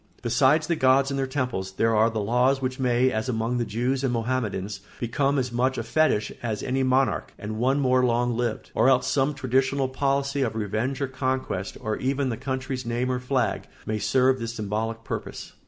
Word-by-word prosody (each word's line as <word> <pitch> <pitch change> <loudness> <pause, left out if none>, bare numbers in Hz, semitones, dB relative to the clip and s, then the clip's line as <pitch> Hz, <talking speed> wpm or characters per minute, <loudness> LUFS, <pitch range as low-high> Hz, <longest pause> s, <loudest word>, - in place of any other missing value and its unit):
Besides 150 +4 +3
the 170 +2 0
gods 135 -1 +3
and 135 - -1
their 135 - 0
temples, 125 -9 -3
there 115 +3 +2
are 110 +2 +4
the 110 - -5
laws 125 +6 +2
which 130 0 -3
may, 125 0 +2
as 110 +2 -2
among 115 +1 -1
the 120 - 0
Jews 125 +5 -1
and 135 - +1
Mohammedans, 110 -5 -2 0.2
become 135 +4 0
as 125 -2 -1
much 130 +2 +1
a - - -2
fetich 155 -10 +1
as 110 -3 -3
any 135 +1 0
monarch, 130 -2 +1
and 110 +1 -5
one 135 +4 +2
more 130 -2 +3
long 120 0 +1
lived; 120 -2 -2
or 130 - +4
else 130 -1 +3
some 140 +1 +1
traditional 135 0 +1
policy 140 +1 0
of 115 -4 0
revenge 110 +6 -2
or 140 - +1
conquest, 130 -7 -2
or 110 0 -2
even 135 +1 0
the 115 - -1
country's 130 -1 -3
name 120 +2 -1
or 125 - -1
flag, 125 +1 -1 0.2
may 110 0 -2
serve 130 +4 +3
this 115 0 -4
symbolic 110 +2 -3
purpose. - - -6
125 Hz, 200 wpm, -25 LUFS, 115-135 Hz, 0.2 s, are